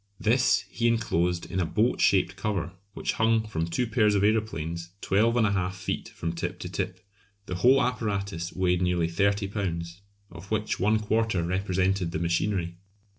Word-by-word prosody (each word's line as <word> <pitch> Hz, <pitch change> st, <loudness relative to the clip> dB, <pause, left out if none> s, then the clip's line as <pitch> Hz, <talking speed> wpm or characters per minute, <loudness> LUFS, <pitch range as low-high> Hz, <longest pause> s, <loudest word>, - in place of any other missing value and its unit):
This 110 Hz, -2 st, +3 dB
he 120 Hz, +4 st, 0 dB
enclosed 90 Hz, -7 st, +1 dB
in 95 Hz, -, -1 dB
a 90 Hz, -, +1 dB
boat 115 Hz, +7 st, +1 dB
shaped 95 Hz, -1 st, +3 dB
cover 100 Hz, -3 st, -2 dB, 0.2 s
which -, -, -2 dB
hung 110 Hz, 0 st, +3 dB
from 80 Hz, -6 st, -2 dB
two 105 Hz, +9 st, 0 dB
pairs 110 Hz, -2 st, +2 dB
of 100 Hz, -, +2 dB
aeroplanes 85 Hz, -6 st, -1 dB
12 110 Hz, +4 st, +2 dB
1/2 100 Hz, -5 st, +1 dB
feet 95 Hz, 0 st, -4 dB
from 85 Hz, 0 st, -4 dB
tip 85 Hz, -, -4 dB
to -, -, -5 dB
tip. -, -, -4 dB, 0.4 s
The 90 Hz, -, -5 dB
whole 130 Hz, +8 st, +5 dB
apparatus 100 Hz, -8 st, -2 dB
weighed 90 Hz, -1 st, +1 dB
nearly 90 Hz, -2 st, +1 dB
30 100 Hz, +3 st, +1 dB
lbs., 85 Hz, -4 st, -3 dB, 0.3 s
of 85 Hz, +3 st, -11 dB
which 110 Hz, -1 st, -1 dB
one 105 Hz, +3 st, +3 dB
quarter 110 Hz, -3 st, 0 dB
represented 95 Hz, 0 st, 0 dB
the -, -, 0 dB
machinery. 85 Hz, +1 st, -1 dB
95 Hz, 165 wpm, -27 LUFS, 85-110 Hz, 0.4 s, whole